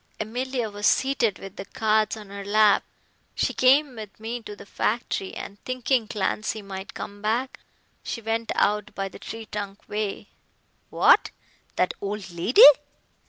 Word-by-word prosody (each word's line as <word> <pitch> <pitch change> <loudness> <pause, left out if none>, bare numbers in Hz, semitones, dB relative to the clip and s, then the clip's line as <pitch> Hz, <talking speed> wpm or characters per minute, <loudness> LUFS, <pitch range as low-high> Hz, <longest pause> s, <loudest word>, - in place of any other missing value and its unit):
Emilia 245 +2 -2
was 205 0 0
seated 260 -7 +2
with 195 -1 -11
the 195 - -6
cards 215 +2 +1
on 210 -2 -11
her 200 0 -7
lap. 210 +1 +4 0.5
She - - 0
came 265 +1 +4
with 215 -2 -10
me 230 +2 -5
to 210 -2 -9
the - - -12
factory, 210 -1 -2
and 200 0 -8
thinking 255 -2 0
Clancy 215 +1 -2
might 190 0 -8
come 205 0 -7
back, 235 +5 -1 0.4
she - - -5
went 225 0 -2
out 210 0 +1
by 195 0 -3
the - - -12
tree 225 0 -7
trunk 200 -1 -6
way." 210 -1 -4 0.6
"What, - - +5 0.5
that 180 - +1
old 200 -1 -5
lady?" 175 +8 +6
215 Hz, 155 wpm, -25 LUFS, 200-230 Hz, 0.6 s, lady